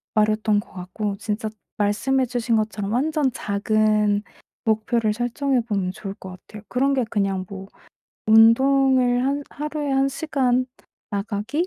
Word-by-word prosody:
말이었던 215 0 +2
것 205 - -10
같고 190 +3 -4
진짜 215 +1 -3 0.3
말씀해 225 +6 +1
주신 240 -1 -1
것처럼 215 -2 -2
완전 280 +2 +1
작은 210 0 +1 0.4
목표를 220 0 +1
설정해 245 +3 0
보면 200 -5 -2
좋을 195 +1 -7
것 190 - -10
같아요. 200 +3 -12
그런 275 +2 +1
게 260 - +1
그냥 195 -3 -1
뭐 195 -1 -8 0.6
운동을 250 +3 +5
한 280 +1 0
하루에 300 0 -4
1 270 0 +2
시간 260 -4 0 0.4
나가기? 210 - -2
225 Hz, 275 characters per minute, -23 LUFS, 205-265 Hz, 0.6 s, 운동을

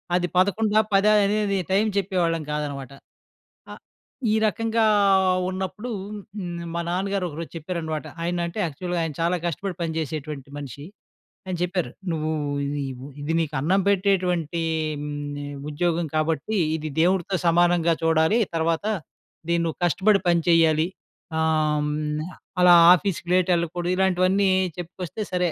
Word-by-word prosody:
అది 180 0 +1
పదకొండా, 210 +3 +3
పదా? 200 +2 +5
అనేది 200 -1 +1
టైమ్ 210 +3 +3
చెప్పేవాళ్ళం 175 -4 0
కాదనమాట. 140 -3 -4 0.8
ఆ! - - -6 0.6
ఈ - - +3
రకంగా 225 +3 +1 0.7
ఉన్నప్పుడూ 190 +6 -4 0.6
న్ 170 0 -5
మా 170 - -1
నాన్నగారొకరోజు 180 -3 -2
చెప్పారనమాట. 160 -2 -4 0.2
ఆయనంటే 175 +3 -2
యాక్చువల్‌గా 175 +3 -3
ఆయన 160 - -3
చాలా 175 +2 +1
కష్టపడి 180 +3 -3
పని 160 -1 -2
చేసేటువంటి 150 -2 -5
మనిషి. 140 0 -8 0.6
ఆయన 185 - -3
చెప్పారు. 180 -7 -2 0.2
"నువ్వూ 155 -1 -1 0.3
ఇది 145 0 -2 0.2
వు - - -8 0.2
ఇది 155 +3 -2
నీకు 155 -2 -2
అన్నం 185 +7 +2
పెట్టేటువంటీ 180 -4 +1 0.4
హ్మ్, 145 -1 -5 0.2
ఉద్యోగం 170 +2 0
కాబట్టి, 160 +6 0 0.2
ఇది 155 0 -5
దేవుడుతో 185 +1 +1
సమానంగా 170 0 +3
చూడాలి. 160 +6 +3 0.2
తర్వాత 165 +1 0 0.7
దీనువ్వు 170 -2 0
కష్టపడి 195 +5 +3
పని 170 -1 +3
చెయ్యాలి. 160 -1 +4 0.5
ఆహ్, 155 -2 +2
హ్మ్, 150 0 -2 0.4
అలా 180 -1 +8 0.2
ఆఫీస్‌కి 175 -2 -3
లేటెళ్ళకూడదు," 175 0 +1
ఇలాంటివన్నీ 190 +1 +3 0.3
చెప్పుకొస్తే 180 +4 -5
సరే. 180 -2 +1
170 Hz, 120 wpm, -24 LUFS, 155-185 Hz, 0.8 s, అలా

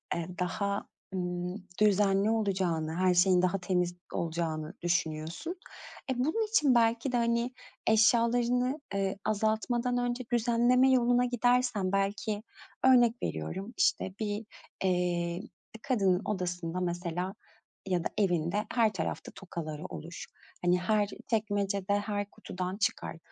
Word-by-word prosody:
eee, 170 -1 -3
daha, 200 +3 -1 0.3
ımm, 180 -1 -2 0.3
düzenli 200 0 +4
olacağını, 185 -7 0
her 185 +1 +3
şeyin 180 0 +5
daha 185 +2 +2
temiz 180 -1 0 0.2
olacağını 160 -1 -2
düşünüyorsun. 170 - -1 0.6
E, 250 - -2
bunun 325 - +1
için 295 - +4
belki 230 +2 +2
de, 245 - +1
hani, 235 +1 +1 0.3
eşyalarını, 240 +4 +3
ııı, 195 -1 0
azaltmadan 220 +4 +1
önce 245 +1 -1
düzenleme 240 +2 +4
yoluna 245 -1 +4
gidersen 245 -5 +2
belki 205 +2 -1 0.4
örnek 245 -2 +5
veriyorum, 190 - -4
işte, 190 - +2
bir, 210 0 -2 0.4
eee, 175 -1 0 0.3
bir - - -9
kadının 195 -9 +2
odasında 180 -3 -2
mesela 175 +1 -2 0.5
ya 180 -3 +1
da - - +1
evinde 180 0 +1
her 225 -3 +3
tarafta 165 -5 -4
tokaları 155 -5 -6
olur. 170 +2 -7 0.4
Hani, 180 0 +3
her 205 +1 +2 0.2
çekmecede, 205 -3 0
her 205 -1 -3
kutudan 185 -3 -5
çıkar. 195 -5 -1
200 Hz, 120 wpm, -30 LUFS, 180-235 Hz, 0.6 s, şeyin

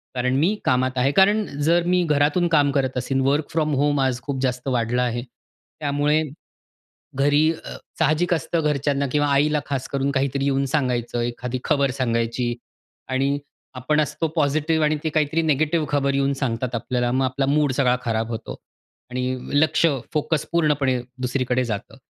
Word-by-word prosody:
कारण 125 +1 0
मी 165 +10 +2
कामात 130 0 +2
आहे. 130 +2 +2
कारण 205 +6 +4 0.2
जर 170 +3 +3
मी 180 - +3
घरातून 150 +2 +2
काम 145 -3 +3
करत 135 -2 -1
असेन, 135 +1 0
वर्क 145 +2 +1
फ्रॉम 155 -2 0
होम 145 -1 +1
आज 130 -2 0
खूप 135 +2 -4
जास्त 125 0 -2
वाढलं 120 -1 0
आहे, 120 -1 -1 0.6
त्यामुळे 145 +1 +1 1.0
घरी 145 +1 +3 0.2
अ, - - -7 0.2
साहजिक 155 +4 +2
असतं 165 +1 -1
घरच्यांना 140 0 0
किंवा 145 0 +2
आईला 150 +2 +2
खास 135 -2 -3
करून 140 0 -1
काहीतरी 135 0 0
येऊन 140 0 +1
सांगायचं. 125 -4 0
एखादी 120 +1 -3
खबर 140 -3 +2
सांगायची 120 -1 -1 0.5
आणि 135 +2 0 0.4
आपण 130 +5 0
असतो 155 +2 -1
पॉझिटिव्ह 155 +1 +1
आणि 150 0 +2
ते - - +1
काहीतरी 155 +1 +1
निगेटिव्ह 155 +1 +1
खबर 140 -1 +1
येऊन 140 0 +1
सांगतात 125 -1 -2
आपल्याला, 120 +1 -1
मग 130 +1 +1
आपला 130 +1 0
मूड 145 0 +2
सगळा 125 -1 +2
खराब 115 -1 -1
होतो 115 -1 -5 0.5
आणि 125 +1 -2 0.2
लक्ष, 155 +1 +2 0.3
फोकस 155 -1 0
पूर्णपणे 145 -6 +2 0.2
दुसरीकडे 125 0 0
जातं. 105 -4 -5
140 Hz, 160 wpm, -22 LUFS, 125-150 Hz, 1.0 s, कारण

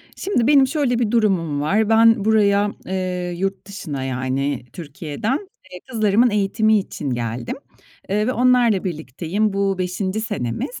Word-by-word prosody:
Şimdi, 370 - 0
benim 275 -2 +5
şöyle 260 -4 0
bir 225 -4 0
durumum 185 -11 +1
var: 205 +8 +1
Ben 225 -1 +5
buraya, 205 -2 +3
eee, 180 -1 -3
yurt 195 +2 -3
dışına, 155 -9 -5
yani, 130 0 -2
Türkiye'den, 170 - -3 0.3
eee, 180 - -8
kızlarımın 220 +1 +3
eğitimi 215 +1 +2
için 150 -6 -5
geldim, 120 -1 -3 0.5
eee, 210 +2 0
ve 255 - +1
onlarla 245 -5 +3
birlikteyim. 170 - -2
Bu 195 -1 0
5'inci 185 +3 -2
senemiz. 205 - -4
200 Hz, 140 wpm, -21 LUFS, 165-220 Hz, 0.5 s, benim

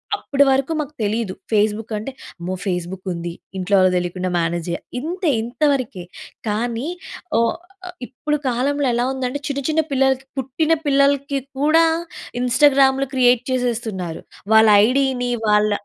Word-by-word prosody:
అప్పటి 280 -7 +2
వరకు 270 +4 +1
మాకు 300 0 -4
తెలీదు. 210 -2 -1 0.2
ఫేస్‌బుక్ 215 +1 +1
అంటే 220 +6 -5 0.3
అమ్మో! 180 +2 -4
ఫేస్‌బుక్ 180 +1 -3
ఉంది, 170 0 -5 0.3
ఇంట్లో 195 +2 +1
వాళ్ళకి 185 -1 +4
తెలియకుండా 180 +1 -2
మేనేజ్ 170 0 -1
చెయ్యా 170 - -2 0.2
ఇంతే 340 +3 -2
ఇంతవరకే. 250 -5 -1 0.4
కానీ, 230 +4 -1 0.5
ఓ - - +4 0.5
ఆహ్, 355 - -9
ఇప్పుడు 300 +4 -2
కాలంలో 280 +4 0
ఎలా 240 +1 +1
ఉందంటే 260 +1 -3
చిన్న 280 -1 -2
చిన్న 320 +1 +3
పిల్లలకి, 265 0 +1
పుట్టిన 290 +5 0
పిల్లలకి 280 0 +2 0.2
కూడా 320 +3 +5 0.6
ఇన్‌స్టాగ్రామ్‌లు 270 +1 +4
క్రియేట్ 250 -1 +4
చేసేస్తున్నారు. 225 -9 -2 0.3
వాళ్ళ 220 0 +7 0.2
ఐడీని 255 -1 +1 0.2
వాళ్ళ 210 0 +3
250 Hz, 135 wpm, -20 LUFS, 210-275 Hz, 0.6 s, వాళ్ళ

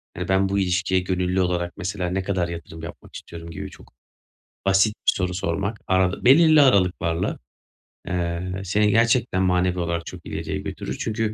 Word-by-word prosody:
hani - - -4
"Ben 95 0 +2
bu 100 0 +1
ilişkiye 95 0 +1
gönüllü 90 0 0
olarak 90 -1 -1
mesela 90 0 -3
ne 95 +1 -1
kadar 95 -3 -1
yatırım 80 -1 -8
yapmak 85 - -10
istiyorum?" 85 0 -9
gibi - - -6
çok - - -17 0.7
basit 95 +2 +4
bir - - +6
soru 90 -1 -2
sormak, 100 +4 -2
aralı 95 0 +1
belirli 155 +3 +7
aralıklarla, 90 -8 +2 0.7
eee, 90 +1 -2
seni 105 +3 +2
gerçekten 115 -3 +2
manevi 90 0 +1
olarak 85 -1 -2
çok 90 -2 -10
ileriye - - -4
götürür. - - -5
Çünkü 110 -1 -1
95 Hz, 160 wpm, -23 LUFS, 90-100 Hz, 0.7 s, belirli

